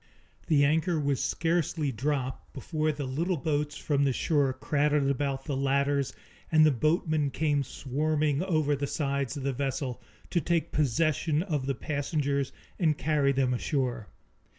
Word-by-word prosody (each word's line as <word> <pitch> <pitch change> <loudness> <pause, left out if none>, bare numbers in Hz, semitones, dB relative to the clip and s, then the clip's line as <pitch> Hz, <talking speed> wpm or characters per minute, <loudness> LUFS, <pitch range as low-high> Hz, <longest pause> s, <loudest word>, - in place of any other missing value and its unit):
The 145 -4 +4
anchor 160 +3 +2
was 140 -2 0
scarcely 165 -3 0
dropped 130 +1 -3
before 155 +2 -1
the 145 -2 -4
little 165 +8 -1
boats 150 0 -1
from 145 -2 0
the 140 - +3
shore 145 -1 +2
crowded 145 +2 +1
about 135 0 -2
the 145 - -2
ladders 140 0 +1 0.4
and 155 -1 +6
the 155 - +5
boatmen 155 +2 +1
came 145 0 +1
swarming 150 +3 -1
over 155 -6 +1
the 140 +1 -2
sides 140 -1 -2
of 140 - -5
the 135 0 0
vessel, 135 -1 -3 0.3
to 170 - +2
take 170 -1 0
possession 155 +2 +1
of 150 -8 -2
the 135 - 0
passengers 140 -1 -1 0.3
and 155 -5 +2
carry 150 -3 +2
them 130 -2 +1
ashore. 125 -4 -1
145 Hz, 150 wpm, -28 LUFS, 135-155 Hz, 0.4 s, and